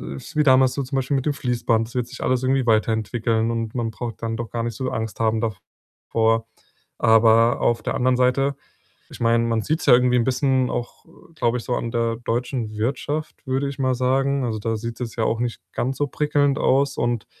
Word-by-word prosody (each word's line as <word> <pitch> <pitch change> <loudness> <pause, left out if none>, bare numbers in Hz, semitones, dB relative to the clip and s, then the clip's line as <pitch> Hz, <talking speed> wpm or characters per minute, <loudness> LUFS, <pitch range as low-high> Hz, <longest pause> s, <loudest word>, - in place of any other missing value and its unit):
ist 160 - -10
wie 150 - +4
damals 130 -2 +5
so 140 - -2
zum 135 +1 -3
Beispiel 135 +2 0
mit 135 - -1
dem 150 - +2
Fließband, 120 -4 0
das 120 - -15
wird 125 -1 -1
sich 130 - -8
alles 130 0 +1
irgendwie 130 -1 +1
weiterentwickeln 110 +1 +1
und 115 -1 -3
man 115 -2 -1
braucht 115 0 -6
dann 115 0 -2
doch 115 -1 -5
gar 115 -1 -2
nicht 115 -2 -3
so 130 -1 -2
Angst 110 -1 -4
haben 110 -1 +1
davor.” 115 +2 -2 0.5
Aber 115 +1 +5
auf 120 - +1
der - - -2
anderen 125 0 +2
Seite 135 +2 +2 0.6
ich - - -11
meine, 115 0 +3
man 115 -2 0
sieht's 155 +7 -2
ja 130 - +8
irgendwie 125 0 +3
'n 115 - +2
bisschen 130 0 +1
auch, 120 - -5 0.3
glaube 120 -4 0
ich, 120 - -8
so 125 - -1
an 115 - -3
der 115 -1 0
deutschen 120 -1 -3
Wirtschaft, 145 +7 -3
würde 135 +2 0
ich 140 - -7
mal 130 -1 +1
sagen, 135 +2 +1
also, 110 -3 -2
da 115 +1 -2
sieht's 115 +2 -6
jetzt 120 -3 -5
ja 115 - +1
auch 115 +1 0
nicht 120 -1 -3
ganz 130 +2 -2
so 145 - +1
prickelnd 145 -1 +1
aus 140 +1 +2
und 120 -2 -1
120 Hz, 215 wpm, -22 LUFS, 115-130 Hz, 0.6 s, ja